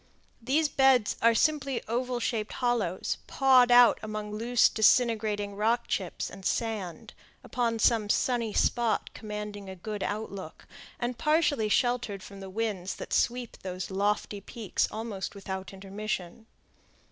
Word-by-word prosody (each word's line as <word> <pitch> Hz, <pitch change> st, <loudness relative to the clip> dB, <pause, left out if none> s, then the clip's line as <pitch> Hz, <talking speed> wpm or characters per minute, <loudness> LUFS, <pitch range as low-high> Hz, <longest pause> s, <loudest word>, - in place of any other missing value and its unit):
These 285 Hz, +6 st, +2 dB
beds 265 Hz, -5 st, +3 dB
are 230 Hz, 0 st, +5 dB
simply 275 Hz, -1 st, +1 dB
oval 245 Hz, +2 st, -1 dB
shaped 225 Hz, -2 st, -2 dB
hollows, 235 Hz, -8 st, -1 dB
pawed 260 Hz, -2 st, +5 dB
out 245 Hz, -1 st, +7 dB
among 215 Hz, -1 st, -5 dB
loose, 230 Hz, +3 st, +3 dB
disintegrating 215 Hz, -3 st, +2 dB
rock 230 Hz, +3 st, +1 dB
chips 185 Hz, -4 st, -2 dB
and 195 Hz, 0 st, -11 dB
sand, 205 Hz, -6 st, -3 dB, 0.3 s
upon 235 Hz, -2 st, -1 dB
some 220 Hz, -1 st, +2 dB
sunny 235 Hz, -1 st, +1 dB
spot 235 Hz, +1 st, +1 dB
commanding 210 Hz, -2 st, -6 dB
a 190 Hz, -, -7 dB
good 205 Hz, +3 st, -6 dB
outlook, 200 Hz, -5 st, -5 dB, 0.3 s
and 240 Hz, 0 st, -3 dB
partially 300 Hz, -8 st, +2 dB
sheltered 240 Hz, -4 st, 0 dB
from 200 Hz, 0 st, -11 dB
the 195 Hz, -1 st, -8 dB
winds 195 Hz, -3 st, -3 dB
that -, -, -7 dB
sweep 245 Hz, -1 st, 0 dB
those 185 Hz, 0 st, -5 dB
lofty 205 Hz, +1 st, -1 dB
peaks 215 Hz, 0 st, -2 dB
almost 215 Hz, -3 st, -5 dB
without 190 Hz, -1 st, -6 dB
intermission. 195 Hz, +1 st, -5 dB
220 Hz, 135 wpm, -28 LUFS, 200-240 Hz, 0.3 s, out